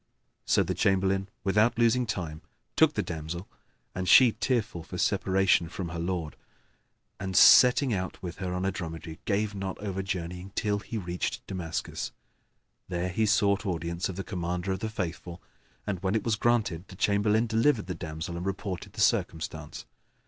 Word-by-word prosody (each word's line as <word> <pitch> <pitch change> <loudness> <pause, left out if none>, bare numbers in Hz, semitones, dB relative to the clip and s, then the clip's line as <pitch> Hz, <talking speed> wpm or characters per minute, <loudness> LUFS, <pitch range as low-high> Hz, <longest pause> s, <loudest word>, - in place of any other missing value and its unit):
So - - +3
the - - -2
Chamberlain, 95 0 +1
without 105 +4 +3
losing 120 +1 +3
time, 85 -7 -4 0.3
took - - +4
the - - 0
damsel 80 +3 -5 0.5
(and 90 -1 -2
she 125 +2 +8
tearful 115 -7 -1
for 80 - -8
separation 95 -3 +2
from 90 0 -5
her 85 0 -5
lord) 85 -3 -3 0.8
and, 95 -1 -2
setting 125 0 +7
out 95 -2 -3
with 90 -2 -7
her 95 -2 -3
on 90 +1 -2
a 95 - +1
dromedary, 80 -3 -6
gave 105 0 0
not 95 -1 -4
over 95 -2 -3
journeying 90 0 -5
till 105 -1 0
he 110 +2 -6
reached 90 -3 -3
Damascus. 85 -4 -4 0.8
There 90 0 -1
he 110 +4 +1
sought 100 0 +3
audience 85 -1 -2
of 95 - -5
the 95 - -4
Commander 90 -1 -3
of 95 - -2
the 110 - -3
Faithful 90 -3 -5 0.5
and, 95 -4 -3
when 95 +2 0
it 110 - 0
was 115 -2 +1
granted, 105 -6 0
the 95 - -12
Chamberlain 105 +3 +2
delivered 115 +1 +2
the 90 - -4
damsel 80 +1 -5
and 90 - -5
reported 95 -2 -4
the - - -4
circumstance. 80 -2 -1
95 Hz, 170 wpm, -28 LUFS, 85-105 Hz, 0.8 s, she